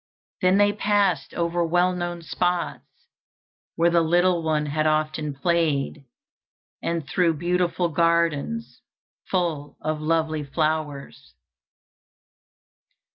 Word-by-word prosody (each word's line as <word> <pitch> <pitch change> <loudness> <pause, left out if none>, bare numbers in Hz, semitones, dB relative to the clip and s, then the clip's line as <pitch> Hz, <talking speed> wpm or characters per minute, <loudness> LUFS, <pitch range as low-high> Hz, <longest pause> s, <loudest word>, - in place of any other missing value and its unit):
Then 185 +1 +4
they 205 0 +4
passed 205 -3 +1
over 170 0 0
well 175 +2 +2
known 175 -1 -4
spots, 175 +1 -1 0.9
where 170 +1 +3
the 170 0 +4
little 175 +2 +2
one 155 -2 0
had 155 +1 0
often 155 -1 -1
played, 150 -3 0 0.8
and 165 -4 -2
through 165 +1 +2
beautiful 175 +1 0
gardens 170 +6 0 0.5
full 165 -6 -2
of 155 0 -3
lovely 155 -1 0
flowers. 155 -1 -3
170 Hz, 100 wpm, -24 LUFS, 155-175 Hz, 0.9 s, Then